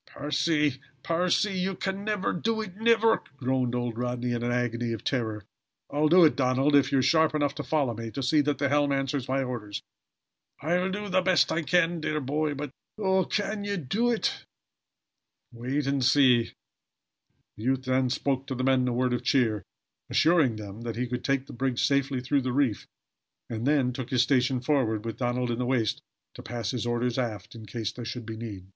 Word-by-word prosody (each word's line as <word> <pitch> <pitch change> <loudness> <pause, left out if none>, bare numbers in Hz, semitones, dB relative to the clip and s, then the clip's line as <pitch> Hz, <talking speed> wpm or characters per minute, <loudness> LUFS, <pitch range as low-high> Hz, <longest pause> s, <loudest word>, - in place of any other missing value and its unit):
"Percy! 150 -2 0 0.2
Percy! 180 +4 +1
You 190 +1 -1
can 195 +2 -3
never 210 -2 -1
do 220 +5 -1
it 190 -4 -7
never!" 225 +1 +3 0.2
groaned 130 -2 0
old 120 -2 -2
Rodney 125 0 -2
in 120 -1 -1
an 120 0 -1
agony 120 -1 -1
of 110 - -6
terror. 110 -6 -2 0.5
"I'll 150 +1 +2
do 175 +1 +7
it, 155 - +3
Donald, 135 +2 +2
if 140 - +4
you 140 - +3
are - - +4
sharp 160 +1 +3
enough 145 -2 +1
to - - -5
follow 145 -6 0
me 115 +1 -6
to 135 +4 -5
see 150 +4 +3
that 145 0 0
the 140 - +1
helm 145 0 +2
answers 135 -1 -1
my 135 +1 +1
orders." 110 -5 -5 0.8
"I'll 175 +5 0
do 205 +2 -4
the 185 -1 +2
best 185 -1 +3
I 170 - +1
can, 165 +2 +2
dear 155 0 -1
boy. 150 +2 -1
But 145 -1 -5 0.3
Oh, 190 -3 +2
can 205 +1 -2
ye 200 0 -2
do 200 - 0
it?" 235 -2 -1 1.1
"Wait 130 +5 -2
and 140 -1 0
see." 125 -3 +4 1.1
The 105 - -9
youth 130 0 +1
then 130 0 +1
spoke 135 +1 -1
to 130 - -3
the 130 - -2
men 130 -1 +3
a 125 - 0
word 125 +1 +1
of 120 0 -2
cheer, 120 -5 +2 0.5
assuring 155 -8 +3
them 105 0 -8
that 115 -1 -4
he 125 +2 -1
could 125 0 -4
take 135 -1 0
the - - -11
brig 125 0 -1
safely 140 -1 +1
through 140 +2 +1
the 130 0 -2
reef, 130 -6 0 0.6
and 115 +3 -2
then 135 -4 +2
took 130 -1 -5
his 125 -2 +3
station 130 0 +2
forward, 120 -6 0
with 115 -1 -4
Donald 120 0 -1
in 115 - -2
the 125 - 0
waist 120 -5 0 0.3
to - - -10
pass 115 -2 -4
his 120 -2 -3
orders 120 +1 0
aft, 110 -4 -4
in 110 -2 -11
case 110 0 -3
there 120 - -8
should 120 0 -5
be 110 0 -6
need. 105 -5 -7
130 Hz, 205 wpm, -27 LUFS, 120-155 Hz, 1.1 s, do